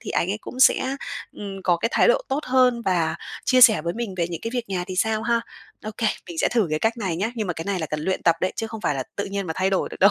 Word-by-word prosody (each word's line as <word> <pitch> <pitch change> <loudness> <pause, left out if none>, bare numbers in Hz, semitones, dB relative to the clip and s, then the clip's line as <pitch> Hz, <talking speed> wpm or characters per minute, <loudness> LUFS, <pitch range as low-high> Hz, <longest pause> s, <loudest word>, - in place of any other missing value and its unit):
thì - - -7
anh 180 - 0
ấy 210 - -2
cũng 255 - -8
sẽ, 260 +1 +4 0.4
ừm, 195 -2 -7
có 175 -2 +3
cái 200 +7 -1
thái - - +4
độ - - +4
tốt 275 +3 0
hơn 250 -2 +3
và 175 -4 +1 0.3
chia 255 0 +4
sẻ 220 -10 +7
với 170 0 -2
mình 225 -5 -4
về 170 -1 0
những 170 -2 -5
cái 230 - -4
việc 240 -4 -2
nhà 180 -2 -2
thì 185 -1 -6
sao 220 +2 +1
ha? 235 0 +1 0.4
Ô 215 - -3
kê, 230 - +1 0.2
mình 170 - -7
sẽ - - +3
thử 230 -6 +2
cái 155 - 0
cách 225 +5 0
này 190 -7 -2
nhá. 210 +6 -1
Nhưng 215 -3 -2
mà 175 - -1
cái 165 +1 -6
này 200 -2 -1
là 160 - -2
cần 150 +1 -4
luyện 185 +4 -1
tập 170 - +4
đấy, 185 - 0
chứ 225 - -2
không 220 -1 -8
phải 145 - 0
là 130 - -2
tự 200 - -1
nhiên 195 -1 -4
mà 160 - -2
thay 190 +1 +1
đổi 190 - 0
được - - -9
đâu. 200 +2 +7
200 Hz, 320 wpm, -23 LUFS, 175-230 Hz, 0.4 s, sẻ